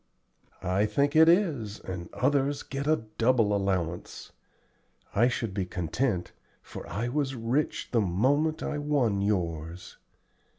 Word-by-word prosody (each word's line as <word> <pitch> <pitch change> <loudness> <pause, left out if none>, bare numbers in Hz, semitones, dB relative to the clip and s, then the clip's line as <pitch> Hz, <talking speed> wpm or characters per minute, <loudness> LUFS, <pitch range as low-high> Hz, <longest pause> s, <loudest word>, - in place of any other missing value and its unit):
"I 95 +4 +1
think 140 +6 +1
it 160 +1 +7
is, 150 - +1
and 90 -2 -6
others 140 +2 +1
get 140 +1 -4
a 155 -6 +2 0.2
double 115 -3 +3
allowance. 90 -4 -2 0.8
I 120 +4 +4
should 115 -5 -2
be 95 -2 -2
content, 90 - -1 0.3
for - - -9
I 115 +4 -2
was 135 +1 -1
rich 125 +6 -1
the 115 - +3
moment 135 - +1
I 150 - -2
won 135 -9 +1
yours." 85 -4 -2
115 Hz, 130 wpm, -28 LUFS, 95-140 Hz, 0.8 s, it